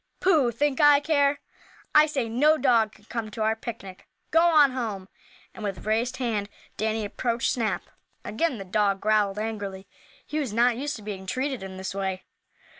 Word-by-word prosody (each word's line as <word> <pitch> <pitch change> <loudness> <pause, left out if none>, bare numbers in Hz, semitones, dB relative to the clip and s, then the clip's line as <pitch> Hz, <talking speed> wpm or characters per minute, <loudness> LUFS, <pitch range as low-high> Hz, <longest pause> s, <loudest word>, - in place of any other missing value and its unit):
"Pooh! 315 -9 +3
Think 270 +4 0
I 295 -1 +7
care? 285 -1 +2 0.5
I 300 0 +7
say 275 -6 -2
no 290 +8 +3
dog 235 -7 +3
can 210 - -21
come 225 -1 -4
to 215 +1 -4
our 220 +1 +2
picnic. 220 -5 -9 0.2
Go 325 - +5
on 310 -5 +5
home!" 215 -7 -4 0.4
and - - -9
with 200 -2 -4
raised 235 +4 0
hand 220 -5 -2 0.3
Danny 220 0 -1
approached 235 +3 -1
Snap. 230 -3 -1 0.4
Again 265 +3 -1
the 195 - -7
dog 200 +1 +1
growled 210 -1 +1
angrily. 205 -3 -5 0.4
He 305 - -3
was 265 -8 -3
not 240 +1 +3
used 285 +4 -3
to 215 - -10
being 195 -2 -7
treated 260 +3 -2
in 190 -1 -8
this 190 0 -5
way. 190 -1 -3
225 Hz, 180 wpm, -26 LUFS, 205-275 Hz, 0.5 s, I